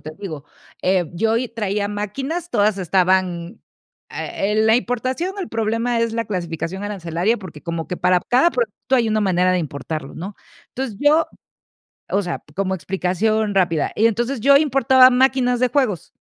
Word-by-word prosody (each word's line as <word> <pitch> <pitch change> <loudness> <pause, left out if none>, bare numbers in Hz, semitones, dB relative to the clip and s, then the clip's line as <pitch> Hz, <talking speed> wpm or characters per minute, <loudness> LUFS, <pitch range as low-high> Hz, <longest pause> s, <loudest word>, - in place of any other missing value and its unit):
te 155 - -8
digo, 155 -8 -7 0.4
eh, 180 -3 +1
yo 225 +6 +1
y 245 +1 -1
traía 210 -3 -2
máquinas, 270 - -4
todas 205 -2 +2
estaban 185 +1 0 0.5
eh, 205 +2 -3
la 220 +1 +4
importación, 255 - -2
el 355 - -4
problema 230 +2 -1
es 230 -1 0
la 230 0 -1
clasificación 180 0 -4
arancelaria, 190 +1 -1
porque 180 -8 -11
como 170 -1 -4
que 180 - -3
para 180 0 +2
cada 260 +8 +4
producto 240 -1 -2
hay 235 -3 +3
una 215 0 +1
manera 185 -2 +2
de 185 - +2
importarlo, 155 -2 -5
¿no? 190 +4 -7 0.3
Entonces, 255 -6 -5
yo 300 +3 +4 0.8
o 200 - +2
sea, 180 -4 -4
como 190 +1 -1
explicación 195 +5 -1
rápida, 170 -5 +1
y 225 - +4
entonces, 240 +4 0
yo 280 +3 +6
importaba 265 -3 +5
máquinas 255 -1 +2
de 255 +1 +2
juegos, 225 - -1
210 Hz, 160 wpm, -20 LUFS, 180-245 Hz, 0.8 s, yo